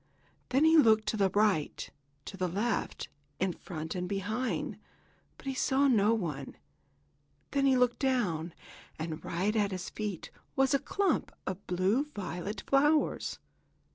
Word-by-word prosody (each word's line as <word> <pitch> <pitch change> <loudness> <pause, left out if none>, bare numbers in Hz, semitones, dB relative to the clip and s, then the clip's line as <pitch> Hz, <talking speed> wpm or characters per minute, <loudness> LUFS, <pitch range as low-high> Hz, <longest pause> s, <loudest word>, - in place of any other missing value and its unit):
Then 270 +5 +3
he 320 0 +6
looked 220 -6 +5
to 220 - -1
the 195 -2 +3
right, 200 -6 +1 0.4
to - - -7
the 185 -1 -1
left, 205 +7 -2 0.3
in 185 -1 +1
front 160 -3 -6
and 180 -1 -3
behind, 210 +6 -2 0.6
but - - -16
he 270 - -1
saw 270 +2 +2
no 220 -4 +4
one. 150 -10 -4 0.9
Then 275 -1 +2
he 265 -1 +4
looked 250 -1 +2
down, 185 - 0 0.4
and 160 0 -5
right 195 +6 -1
at 205 -2 +2
his 185 -2 -5
feet 210 -6 -5 0.2
was 270 0 +3
a 275 - +4
clump 390 +8 0
of 185 +2 -5
blue 190 +10 +2
violet 195 +1 -4
flowers. 295 +3 +2
210 Hz, 145 wpm, -31 LUFS, 180-260 Hz, 0.9 s, he